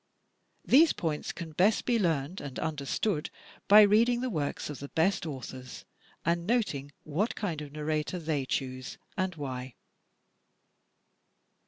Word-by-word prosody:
These 310 +5 +6
points 155 -3 -2
can 165 -3 -7
best 190 +8 +3
be 240 -2 +2
learned 165 -2 0
and 140 -3 -7
understood 150 +3 -1 0.4
by 210 +1 +9
reading 230 +4 +4
the 255 -1 -1
works 150 -6 -2
of 150 -3 -6
the 140 - -6
best 170 +1 +1
authors 130 -3 -7 0.4
and 170 +1 +1
noting 180 - 0
what 175 +10 -1
kind 170 -7 -3
of 145 -2 -8
narrator 155 +3 -2
they 155 -5 -2
choose 130 -1 -3 0.2
and 185 -3 -1
why. 130 -4 -5
160 Hz, 135 wpm, -30 LUFS, 140-200 Hz, 0.4 s, by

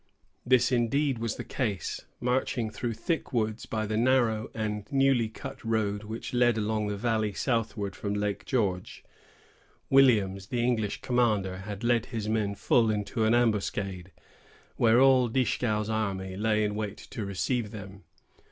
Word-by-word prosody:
This 125 0 +4
was 125 - +3
indeed 135 +3 +1
the 115 -2 -3
case. 105 -8 -3
Marching 125 -2 0
through 115 0 -3
thick 165 - -2
woods, 110 -2 -1
by 110 -1 -2
the 110 +1 -2
narrow 115 -3 +2
and 105 -2 -3
newly 135 -4 +3
cut 135 +5 -9
road 105 -2 -1
which 110 +3 -6
led 120 -2 +3
along 110 0 0
the 105 0 -3
valley 110 -1 0
southward 110 -4 -1
from 100 -1 -3
Lake 105 -1 -2
George, 100 -9 -1 0.9
Williams, 105 -8 +4
the 120 +2 -1
English 110 -4 0
commander, 110 -7 +1
had 100 +3 -7
led 120 -1 +2
his 110 -4 -4
men 105 -2 0
full 115 +2 +3
into 110 +2 -1
an 110 +2 +4
ambuscade, 100 -5 0 0.6
where 115 +1 +4
all 130 -2 +5
Dieskau's 110 -3 0
army 100 -4 -2
lay 105 +1 +1
in 105 -1 0
wait 105 -1 -4
to 110 - -7
receive 105 +4 -1
them. 100 -2 -10
110 Hz, 150 wpm, -28 LUFS, 105-120 Hz, 0.9 s, all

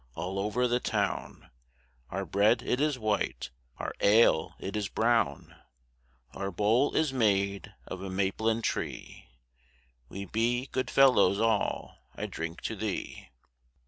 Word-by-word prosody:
all 90 +4 -3
over 110 +5 +1
the 120 0 +1
town, - - -3 0.6
Our 95 +2 -3
bread 100 +7 +2
it 125 - 0
is 150 -3 +1
white, 105 - -2 0.3
our - - -4
ale 110 +3 +4
it 100 +2 -5
is 105 -2 -1
brown; 115 +1 0 0.8
Our 95 +4 -3
bowl 105 +9 +2
is 155 -4 +1
made 100 -5 0
of 95 - -7
a 95 - -5
maplin 105 +4 0
tree; - - -4 0.8
We 100 +1 -6
be 120 +5 0
good 130 - -1
fellows 130 -7 +5
all; 110 -2 0 0.2
I - - -4
drink 80 +1 -6
to 110 - -3
thee. 105 -1 -5
105 Hz, 135 wpm, -29 LUFS, 95-120 Hz, 0.8 s, fellows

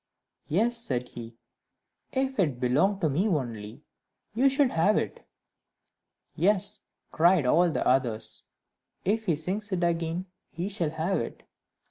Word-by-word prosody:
"Yes," 230 +9 +2
said 125 - -1
he, 115 -1 -10 0.7
"if 265 -2 -1
it 145 -10 +1
belonged 170 +11 +2
to 160 - +2
me 180 +10 +1
only, 115 - -3 0.5
you 260 +5 +4
should 270 -1 +2
have 180 +6 +3
it." - - -4 1.1
"Yes," 205 +2 +2 0.3
cried 170 -2 +4
all 170 +7 +4
the 160 - -2
others, 115 -4 0 0.6
"if 220 +4 0
he 170 -6 +2
sings 195 +7 -3
it 180 -2 0
again, 170 +1 -1 0.2
he 175 +4 -4
shall 190 -6 -1
have 160 +5 -1
it." - - -6
175 Hz, 135 wpm, -27 LUFS, 140-205 Hz, 1.1 s, you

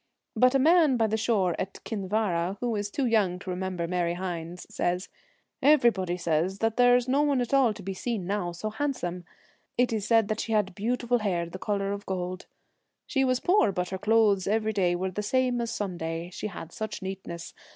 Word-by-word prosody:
But 255 +4 +4
a - - +7
man 310 -1 +5
by 225 - +3
the 220 0 0
shore 210 -5 +1
at 190 +1 -5
Kin 200 -4 -4
vara, 190 -3 0
who 240 -2 -1
is 205 0 -2
too 270 +6 -1
young 210 -6 +2
to 185 0 -6
remember 180 -2 -3
Mary 175 -1 0
Hynes, 175 -1 -5
says, 180 +2 -2 0.3
' - - -47
Everybody 190 -10 +1
says 170 +2 0
there 245 +3 +4
is 245 0 +1
no 270 +3 +3
one 285 -3 +2
at 245 +1 -2
all 265 -4 +5
to 210 -1 -9
be 195 +1 -3
seen 215 -1 -3
now 190 -2 -1
so 195 +6 -5
handsome; 210 - -3 0.5
it 245 -1 +2
is 210 -2 -2
said 220 -1 +3
she 225 - -2
had 205 -3 +1
beautiful 240 +4 0
hair, 180 -5 0
the 185 +3 -8
colour 200 -1 -1
of 200 0 -5
gold. 185 -1 -4 0.6
She 270 -2 +1
was 255 -1 +2
poor, 360 - +3
but 180 -1 -2
her 190 - -4
clothes 210 -3 +3
every 220 +1 +1
day 180 -3 +2
were 185 +1 -2
the 210 - -3
same 250 +3 +1
as 235 - -2
Sun 205 -6 -3
day, 165 +1 -4
she 210 - -4
had 175 -4 -8
such 215 0 -5
neatness. 190 -3 -6
205 Hz, 210 wpm, -27 LUFS, 180-230 Hz, 0.6 s, a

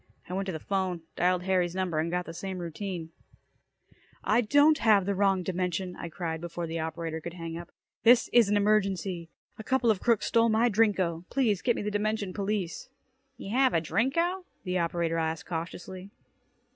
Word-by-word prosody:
I 180 - -6
went 195 +1 -2
to - - -1
the 160 - -4
'phone, 185 -2 -2
dialed 180 +1 +2
Harry's 180 -2 +1
number, 185 -4 -1
and 160 +2 0
got 180 +1 -1
the 165 - -7
same 190 +2 -5
routine. 175 -1 -5 1.1
"I 225 +3 +3
don't 290 +6 +4
have 210 -4 +4
the 200 - 0
wrong 195 -1 +2
dimension," 180 0 -2
I 170 - -6
cried 165 -1 -4
before 175 0 -4
the 165 0 -4
operator 160 0 -4
could 170 +2 -7
hang 165 -2 -6
up. 170 +1 -8 0.3
"This 240 +1 +6
is 235 -4 +6
an 205 - +3
emergency. 195 -4 +1 0.3
A - - -6
couple 255 -1 +2
of 200 - -2
crooks 235 -3 +2
stole 230 0 +3
my 225 +2 +3
Drinko. 190 -6 +1
Please 225 -8 +1
get 240 -2 +2
me - - -3
the 210 - -2
dimension 210 -2 -1
police." 200 +1 -3 0.5
"You 195 - -7
have 260 -4 +4
a - - +5
Drinko?" 335 - 0 0.2
the 180 -1 -1
operator 170 -1 0
asked 160 0 -2
cautiously. 180 +3 -6
185 Hz, 185 wpm, -28 LUFS, 170-215 Hz, 1.1 s, This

